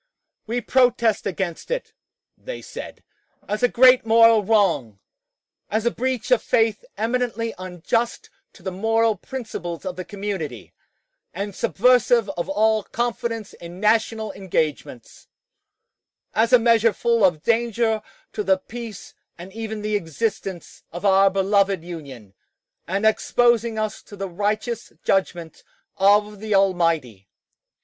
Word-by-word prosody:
"We 240 +2 -1
protest 235 -3 +2
against 185 -3 -4
it," - - -3 0.4
they - - -8
said, - - -9 0.4
"as 210 +3 -2
a 245 - +5
great 255 +1 +6
moral 225 -1 +5
wrong, 190 - +1 0.7
as 220 +2 -1
a 235 - +3
breach 255 - -3
of - - +5
faith 225 - +1
eminently 230 0 -1
unjust 185 +6 -2 0.2
to 185 - -18
the 190 - -3
moral 225 +3 +1
principles 195 -7 -7
of 185 -1 -5
the 185 - -4
community, 190 - -6 0.6
and 200 +2 -4
subversive 235 - +3
of 175 -1 -5
all 215 +2 +2
confidence 235 -1 -3
in 170 +1 -11
national 220 0 +1
engagements; 155 - -4 1.1
as 225 +2 +2
a 250 - +9
measure 230 -1 +3
full 235 +1 +1
of 170 -5 +3
danger 230 -1 +1 0.3
to 210 - -2
the 190 -1 +3
peace 225 +1 -9 0.2
and 180 +3 -11
even 220 -1 -5
the 210 0 -1
existence 190 0 -4
of 175 +4 -7
our 195 0 +5
beloved 195 -1 +1
Union, 140 - -9 0.5
and 195 +4 -1
exposing 235 +1 +2
us 215 -1 -3
to 205 - -13
the 195 0 -4
righteous 210 +5 -3
judgment 175 -4 -1 0.3
of 205 +1 +3
the 215 -1 -1
Almighty." 165 - +1
210 Hz, 130 wpm, -22 LUFS, 185-230 Hz, 1.1 s, a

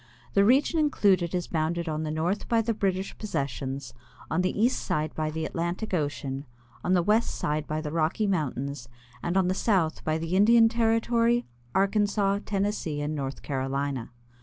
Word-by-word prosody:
The 200 - +5
region 270 +9 +4
included 190 - +2
is 175 -2 -1
bounded 170 +2 -1
on 155 -1 -2
the 155 - -3
north 165 +6 -1
by 230 -1 +3
the 230 +1 0
British 195 -2 -1
possessions, 135 - -3 0.4
on 160 - +2
the 185 +2 -1
east 240 +4 +1
by 155 0 -1
the 160 0 -3
Atlantic 175 +5 -3
ocean, 145 -3 -2 0.4
on 180 - +1
the 180 -2 +3
west 215 +5 +1
by 155 +1 -1
the 150 -1 -4
Rocky 165 +6 +1
mountains, 140 - -2 0.3
and 175 +2 -1
on 190 -2 +3
the 185 - +2
south 185 -6 +1
by 155 0 0
the 165 +2 -2
Indian 225 +3 +6
Territory, 230 +1 +2 0.3
Arkansas, 200 0 +2
Tennessee, 195 -7 -1
and 145 +1 -2
North 135 -2 -4
Carolina. 135 -2 -2
175 Hz, 160 wpm, -27 LUFS, 150-205 Hz, 0.4 s, Indian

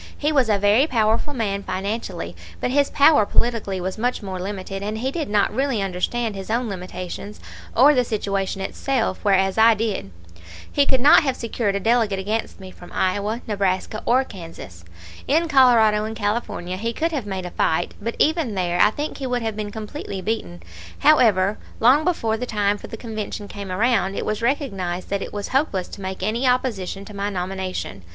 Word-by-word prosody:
He 300 +1 0
was 265 -6 +3
a 210 - +4
very 205 +8 +4
powerful 225 +1 +1
man 210 -7 -2
financially, 190 - -4 0.2
but - - -1
his 280 +1 +3
power 285 -4 +5
politically 210 -3 0
was 185 +3 -4
much 245 -1 -1
more 190 -2 -5
limited, 195 0 -5
and 210 +2 -3
he 260 +4 -2
did 310 -4 -3
not 205 -1 +2
really 270 -4 0
understand 200 +4 -1
his 195 0 -7
own 235 +2 0
limitations 185 +2 -6 0.4
or 280 +5 +7
the 250 -3 +3
situation 195 -4 -2
itself, 230 +1 -1
whereas 195 0 +2
I 225 0 +7
did. 210 - -2 0.6
He 285 -1 +3
could 260 -2 +3
not 285 - +8
have 270 -4 0
secured 230 -4 -2
a - - 0
delegate 225 -1 +2
against 210 +4 -3
me 190 -1 -10
from 175 -1 -14
Iowa, 205 +5 -1
Nebraska, 200 0 -1
or 255 +2 +4
Kansas. 165 - -10 0.4
In 325 +4 +2
Colorado 235 -7 +5
and 220 +1 -4
California 205 -4 -2
he 230 +4 -2
could 330 +7 -1
have 270 -9 -3
made 190 -2 -4
a 180 - -6
fight, 160 - 0
but 230 +3 -3
even 310 -9 +1
there 175 -2 +1
I 210 - +7
think 295 +7 -4
he 270 - -3
would 245 -1 -1
have 220 -1 -2
been 210 -1 -4
completely 210 -1 -6
beaten. 185 - -4 0.3
However, 215 -10 +4 0.2
long 260 +7 +5
before 230 -11 0
the 250 +2 -4
time 205 -2 0
for - - -9
the 225 - -7
Convention 215 -2 -5
came 200 -2 -7
around, 205 -1 +1
it - - -3
was 215 +1 -2
recognized 195 - -2
that 200 -1 0
it - - -5
was 205 -1 -5
hopeless 260 -9 0
to 200 - -9
make 190 0 -5
any 230 +6 0
opposition 210 -6 -1
to 210 - -11
my 200 +1 -2
nomination. 185 - -4
215 Hz, 190 wpm, -22 LUFS, 195-245 Hz, 0.6 s, not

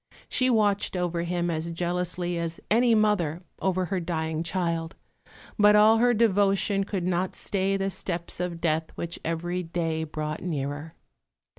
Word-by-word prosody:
She 255 0 +2
watched 210 -5 +2
over 175 -1 -1
him 175 0 -1
as 160 +1 -2
jealously 175 +1 -2
as 165 0 -3
any 235 +1 +5
mother 190 -6 +1 0.2
over 185 -1 +1
her 185 +2 -1
dying 160 -2 -2
child; 170 -2 -2 0.6
but 210 0 +7
all 215 +2 +6
her 245 +1 +4
devotion 200 -2 +2
could 190 -3 -3
not 180 +1 0
stay 195 0 0
the 195 0 -1
steps 175 -2 -4
of 180 -2 -3
death, 160 -1 +1
which 170 0 -5
every 175 +2 -2
day 165 -2 -2
brought 155 0 -4
nearer. 145 -1 -4
175 Hz, 150 wpm, -26 LUFS, 165-195 Hz, 0.6 s, but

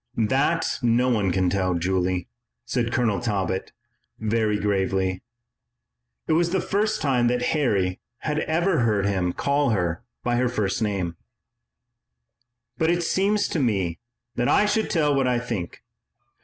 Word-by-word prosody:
"That 135 +9 +1
no 120 +1 +3
one 105 -6 +1
can 95 +1 +1
tell, 90 -1 0
Julie," 90 0 0 0.4
said 120 -2 -1
Colonel 115 -5 +1
Talbot 95 -5 -2 0.5
very 110 -1 0
gravely 95 -2 0 1.1
it - - +2
was 170 +2 +2
the 190 +2 +1
first 210 +4 0
time 125 -4 +2
that 125 0 0
Harry 100 - +1 0.2
had 150 0 -1
ever 170 +2 +1
heard 105 -4 +2
him 95 -3 0
call 140 +7 +1
her 90 -6 -1 0.2
by 120 0 +1
her 125 0 +2
first 105 -3 -1
name 95 -6 -1 1.6
"but 160 - +2
it 175 0 +1
seems 200 +5 +1
to 165 - -1
me 95 - 0 0.4
that 120 0 +1
I 210 - +4
should 215 +1 0
tell 150 -3 +2
what 135 -2 +2
I 125 -1 +2
think. 115 -8 -5
115 Hz, 145 wpm, -24 LUFS, 95-145 Hz, 1.6 s, I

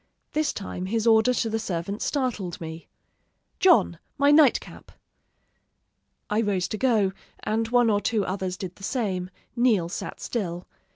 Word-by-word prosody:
This 310 0 0
time 185 -2 -5
his 225 +2 -1
order 225 +2 +5
to 245 -2 0
the 225 0 -1
servant 195 +1 -4
startled 240 - -2
me: 160 0 -8 0.7
"'John, 345 - +4 0.2
my 285 +1 +4
night 295 -4 +6
cap!' - - -14 1.4
"I 210 +2 +1
rose 195 -4 0
to 215 - -3
go, 220 -7 +2 0.3
and 225 +1 0
one 240 -1 +3
or 205 0 +1
two 215 -2 0
others 185 -1 -3
did 185 -3 -7
the 195 - -15
same; 190 -6 -2 0.3
Neal 225 -9 +2
sat - - -6
still. 180 -6 -4
215 Hz, 155 wpm, -25 LUFS, 185-240 Hz, 1.4 s, night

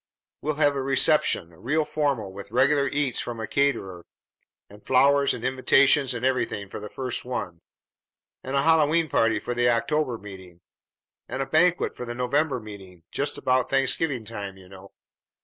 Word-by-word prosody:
We'll 155 0 -2
have 145 -1 +2
a 135 - -2
reception, 135 - +2
real 130 - -1
formal, 140 -11 -2
with 100 +1 -9
regular 140 -2 +2
eats 140 -4 0
from 120 -2 -5
a 110 - -3
caterer, 105 -9 -1 0.6
and 105 +1 -16
flowers 140 +2 +3
and 115 - -9
invitations 130 +1 +3
and 120 +1 -3
everything, 120 -6 -1
for - - -7
the 105 0 -8
first 130 0 -4
one; 95 -9 -5 0.8
and 130 +2 -4
a 135 - +2
Hallowe'en 160 0 +3
party 115 -2 +2
for 120 - -4
the 120 0 +2
October 120 +2 0
meeting, 95 -4 -12 0.7
and 130 +2 -2
a - - -6
banquet 165 +5 +2
for 125 - -6
the 120 0 -6
November 135 +3 0
meeting, 95 -5 -12
just 145 - -2
about 130 0 +1
Thanksgiving 135 -1 0
time, 100 -3 -7
you 95 -1 -16
know. 95 +1 -14
125 Hz, 165 wpm, -25 LUFS, 105-140 Hz, 0.8 s, flowers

